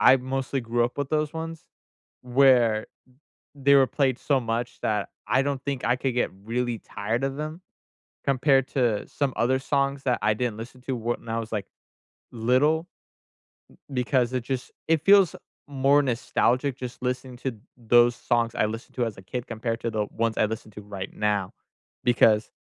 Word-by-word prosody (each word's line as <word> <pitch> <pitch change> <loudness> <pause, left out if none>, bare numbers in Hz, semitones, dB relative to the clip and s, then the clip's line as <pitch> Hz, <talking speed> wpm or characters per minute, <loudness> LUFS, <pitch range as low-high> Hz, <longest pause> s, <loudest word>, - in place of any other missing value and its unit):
I 130 - +7
mostly 135 +1 -2
grew 120 0 +1
up 120 +4 -4
with 140 - -1
those 155 -1 0
ones 165 0 -6 0.6
where 125 -4 +4 0.7
they 140 0 +4
were 135 -1 +6
played 130 0 0
so 140 -3 +1
much 120 0 -3
that 105 -2 0 0.2
I 130 - +3
don't 140 -1 -2
think 140 -2 -3
I 120 - +3
could 130 -1 -2
get 125 - +1
really 120 +1 -1
tired 110 +6 -3
of 135 0 -2
them 155 +3 -5 0.7
compared 135 0 +3
to 120 -6 0
some 140 -2 -1
other 130 +3 +2
songs 140 0 0
that 125 -2 +1
I 105 - +3
didn't 120 -2 -1
listen 120 +3 -9
to 130 +1 -3
w 120 +1 -1
when - - -17
I 115 0 -1
was, 115 0 -6
like, 105 -3 -2 0.7
little, 130 +7 +2 1.1
b 125 -1 +1
because 125 -1 +1
it 125 -2 -1
just, 130 0 -4 0.2
it 160 -2 +2
feels 195 -4 +6 0.3
more 140 +1 +3
nostalgic 125 +1 +1
just 125 -2 -7
listening 125 0 -3
to 130 0 -3 0.2
those 120 0 +4
songs 115 -1 0
I - - +2
listened 115 +2 -6
to 125 - +1
as 110 -3 -5
a - - -10
kid 120 +6 -5
compared 115 0 -3
to 115 - -1
the 105 -1 0
ones 115 0 -1
I - - +4
listened 110 -1 -6
to 105 - -9
right 100 -1 -7
now 105 -3 -1 0.5
because 110 -3 +4
125 Hz, 185 wpm, -26 LUFS, 115-135 Hz, 1.1 s, I